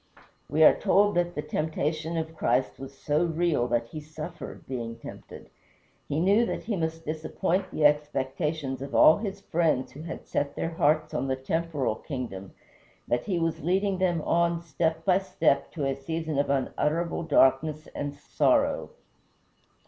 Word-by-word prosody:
We 155 +3 +3
are - - +9
told 205 +1 +3
that 175 0 0
the 150 - -3
temptation 155 +1 -2
of 160 0 -4
Christ 125 -3 0
was 135 0 -9
so 150 +3 +1
real 165 -6 +1
that 115 -1 0
he 155 - -6
suffered, 155 +3 -8
being 115 -3 -4
tempted. - - -11 0.6
He 145 - 0
knew 200 +7 +4
that - - -3
he 220 -2 -2
must 165 -1 -3
disappoint 160 +4 -1
the 150 - 0
expectations 145 -1 0
of 140 0 -5
all 155 - +7
his 200 -2 -5
friends 160 -8 0
who 145 - -10
had 165 +1 -7
set 140 0 -2
their 165 - -2
hearts 155 -1 +1
on 135 - -1
the 130 - 0
temporal 140 -3 -1
kingdom, 115 -9 -6 0.5
that 120 0 0
he 190 -4 -1
was 165 -1 -1
leading 190 +4 +1
them 175 -4 +1
on 170 0 +1
step 160 +1 -1
by 185 -1 +4
step 190 -7 +1
to 150 -5 -2
a 135 - +1
season 155 +2 -3
of 140 - +1
unutterable 150 +5 0
darkness 155 0 +3
and 145 0 -4
sorrow. 145 - +1
155 Hz, 165 wpm, -27 LUFS, 140-170 Hz, 0.6 s, are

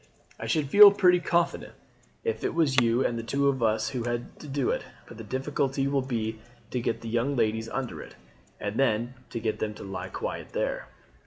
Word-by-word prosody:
I - - -5
should 150 -3 0
feel 205 0 +11
pretty 180 -3 +4
confident 170 0 0 0.5
if 110 -1 -2
it - - -1
was 150 -5 +2
you 120 +2 +2
and 115 -1 -2
two 140 0 +2
of 135 -2 -1
us 110 -1 +1
who 125 -3 -3
had 120 0 -4
to 150 - -10
do 140 -2 0
it; - - -2 0.2
but - - -12
the - - -6
difficulty 135 +3 -1
will 140 -1 +1
be 110 -4 -3 0.3
to 125 - -1
get 115 - -2
the 115 - -7
young 120 +5 0
ladies 110 -1 0
under 135 -3 -4
it, - - -12 0.4
and 105 +3 -3
then 120 -2 +1 0.2
to 115 - -4
get 110 -1 -2
them 105 -1 -2
to - - -9
lie 95 -1 -5
quiet - - -5
there." - - -2
120 Hz, 210 wpm, -27 LUFS, 110-140 Hz, 0.5 s, feel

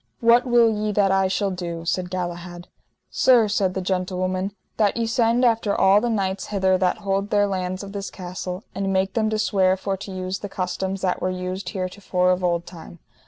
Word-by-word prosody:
What 235 +2 +4
will 240 -1 +5
ye 210 0 -1
that 195 -1 +3
I 195 0 +3
shall 195 +1 0
do? 170 -2 -5
said 180 +1 -1
Galahad. 175 -1 -5 0.4
Sir, 245 -4 +4
said 200 -3 0
the 190 - -2
gentlewoman, 185 +1 -1 0.3
that 210 -1 +2
ye 230 - 0
send 230 +1 +2
after 225 -3 +2
all 195 +2 +5
the 240 - 0
knights 195 -3 -1
hither 190 -2 +2
that 180 -1 +1
hold 195 +1 0
their 205 -1 +3
lands 185 -1 -3
of 200 - -8
this 200 -1 -5
castle, 180 +1 -6
and 195 0 -2
make 190 0 0
them 220 -2 +1
to 215 - -1
swear 190 -3 +2
for 195 +1 -2
to 200 +1 -8
use 185 0 -4
the 205 - -6
customs 190 +1 -3
that 185 -2 -1
were 185 - 0
used 185 0 -4
heretofore 185 -1 -1
of 185 0 0
old 170 -1 0
time. 170 -1 -11
190 Hz, 205 wpm, -23 LUFS, 185-205 Hz, 0.4 s, will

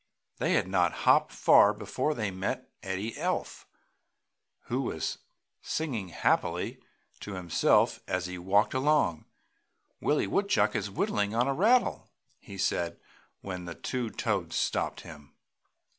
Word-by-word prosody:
They - - +1
had - - +2
not 90 -2 +2
hopped - - +5
far 105 +1 +5
before 125 +8 -2
they 105 -4 -2
met 95 +8 -4
Eddie 95 +3 -4
Elf, - - -3 0.9
who - - -2
was - - -3 0.4
singing 130 -12 -3
happily 85 - 0 0.4
to 100 - -7
himself 90 -3 +2
as 90 -1 -1
he 90 0 -6
walked 100 +4 +2
along. 135 - +2 0.7
"Willie 150 - +1
Woodchuck 200 -8 +1
is 105 -2 -1
whittling 100 +2 -1
on 120 +3 +2
a 135 - +1
rattle!" 225 - +2 0.3
he 100 - -11
said, 85 -2 -1 0.4
when 90 -2 -6
the 85 -1 -7
two 120 - -3
Toads 100 -8 -2
stopped - - -1
him. 75 -3 -13
100 Hz, 130 wpm, -29 LUFS, 90-130 Hz, 0.9 s, hopped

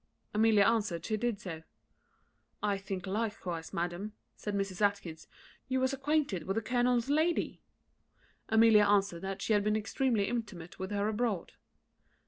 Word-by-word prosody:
Amelia 215 -1 +5
answered, 205 -6 +1
she 215 - 0
did 225 -1 -1
so. 165 -6 -6 1.0
"I 200 -2 +1
think 190 -2 -5
likewise, 190 -5 -3
madam," 175 +5 -3 0.2
said 210 -1 -4
Mrs. 195 -1 -2
Atkinson, 180 -6 -1 0.4
"you 260 0 0
was 260 +1 +1
acquainted 275 - 0
with 195 - 0
the 225 - +1
colonel's 245 0 +1
lady?" 315 +4 +1 0.9
Amelia 220 -1 +6
answered 200 -4 +2
that 195 0 -4
she 220 - +1
had 205 -1 +3
been 210 +1 +1
extremely 215 0 0
intimate 210 -8 -5
with 190 0 -4
her 205 0 0
abroad. 220 -4 -1
210 Hz, 145 wpm, -31 LUFS, 190-230 Hz, 1.0 s, Amelia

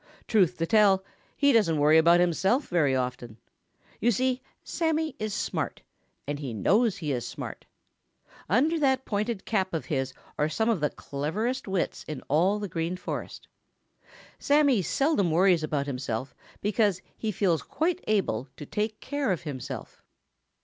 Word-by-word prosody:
Truth 200 -7 +3
to 165 - 0
tell, 195 0 +4 0.3
he 285 -1 +4
doesn't 200 -9 +3
worry 150 +2 +6
about 170 +2 +5
himself 190 - +2
very 150 -7 +2
often. 125 -3 -3 0.6
You 235 - +2
see, 255 +3 +1 0.2
Sammy 320 -1 -1
is 215 0 -2
smart, - - -3 0.4
and 145 0 -3
he 130 -6 -5
knows 210 - +2
he 150 -4 -3
is 120 -3 -2
smart. - - -7 0.8
Under 300 - +3
that 265 -2 +2
pointed 210 0 -2
cap 190 -5 0
of 160 - -3
his 130 0 -2 0.2
are 150 - +2
some 220 +8 0
of 215 - 0
the 150 0 +1
cleverest 205 - -3
wits 190 -2 -2
in 150 -4 -6
all 175 +8 +3
the 210 -1 -4
Green 165 +1 -2
Forest. - - -6 0.9
Sammy 285 -6 +4
seldom 270 - +1
worries 175 +1 +4
about 150 -2 -1
himself 130 -2 -4 0.3
because 205 -3 +1
he 220 - -2
feels 175 -4 +1
quite 355 +3 -1
able 190 - 0
to 150 - -7
take 210 +6 -3
care 285 -6 -1
of 180 - -2
himself. 140 -5 -7
190 Hz, 155 wpm, -27 LUFS, 150-225 Hz, 0.9 s, worry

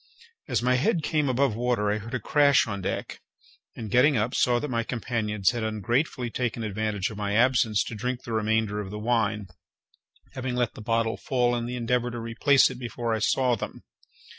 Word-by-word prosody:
As - - 0
my 125 0 +3
head 165 - +1
came 150 -3 +1
above 130 -2 +1
water 120 -3 0
I 105 - -1
heard 115 +4 -6
a - - -1
crash 140 +4 +4
on 100 -3 -4
deck, - - -4 0.5
and, 115 - -7
upon - - -6
getting 130 +3 +4
up, 110 +4 0
saw 120 -1 +3
that 135 - -2
my 120 -4 -1
companions 110 -4 -1
had 120 -1 -4
ungratefully 120 - -1
taken 120 -2 -2
advantage 105 -1 -2
of 105 - -9
my 100 -1 -2
absence 115 -3 +3
to - - -7
drink 125 +3 -3
the 115 - -5
remainder 110 -1 0
of 100 -2 -5
the 105 - -6
wine, 110 -2 0 0.9
having 130 -2 -3
let 120 -2 0
the - - -10
bottle 115 +1 0
fall 125 -2 +1
in 120 0 -3
the 125 - -4
endeavour 125 0 0
to 120 0 -6
replace 130 +5 +3
it 125 - -9
before 120 -1 -3
I 110 - 0
saw 125 +3 +2
them. 105 - -7
115 Hz, 205 wpm, -26 LUFS, 110-125 Hz, 0.9 s, crash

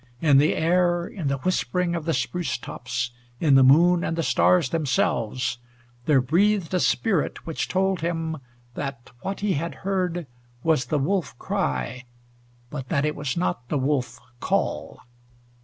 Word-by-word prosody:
In 145 -3 +5
the 150 - +3
air, 175 +1 +2
in 175 -6 -5
the 140 0 0
whispering 180 +2 0
of 165 -3 -3
the 165 - +1
spruce 175 -8 -2
tops, 125 0 -4 0.3
in 150 -4 +3
the 135 - +7
moon 170 +6 +5
and 165 - -2
the 165 - 0
stars 170 -2 +3
themselves, 125 -5 0 0.5
there 140 -4 +5
breathed 185 +6 +2
a 180 - +3
spirit 190 -3 0
which 165 - -3
told 190 -1 0
him 165 -1 -2 0.4
that 135 -4 -6
what 195 +1 -4
he 205 -2 +1
had 165 +3 -3
heard 180 -3 -1 0.4
was 155 -6 +2
the 150 - 0
wolf 145 -3 -1
cry, 65 - -2 0.7
but 135 -3 -6
that 145 -3 +1
it 150 - -1
was 145 +1 -3
not 125 -8 -2
the 150 - 0
wolf 135 -1 -1 0.2
call. - - -1
160 Hz, 155 wpm, -24 LUFS, 135-175 Hz, 0.7 s, the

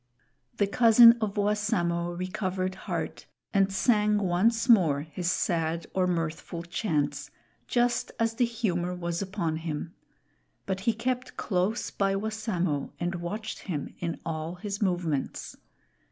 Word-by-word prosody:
The 205 - +3
cousin 230 +2 +8
of 210 -2 -1
Wassamo 200 -5 0
recovered 185 0 -2
heart 185 - -5 0.3
and 195 -1 +3
sang 210 +1 +3
once 205 +5 +2
more 170 - +5
his 165 +3 -3
sad 165 -2 0
or 185 -1 +2
mirthful 165 0 -3
chants, 150 -6 -1 0.4
just 240 0 +1
as 225 0 +1
the 245 +2 +2
humor 180 -7 -1
was 170 0 -3
upon 185 -5 -2
him; 160 0 -4 0.7
but 190 - -2
he - - +3
kept 250 +2 -3
close 195 +3 -1
by 195 -1 +1
Wassamo 195 -8 -1
and 175 +1 -1
watched 200 +6 -4
him 150 -5 -3
in 170 -2 -3
all 160 +1 -3
his 200 +2 -5
movements. 175 -8 -1
185 Hz, 130 wpm, -28 LUFS, 170-215 Hz, 0.7 s, cousin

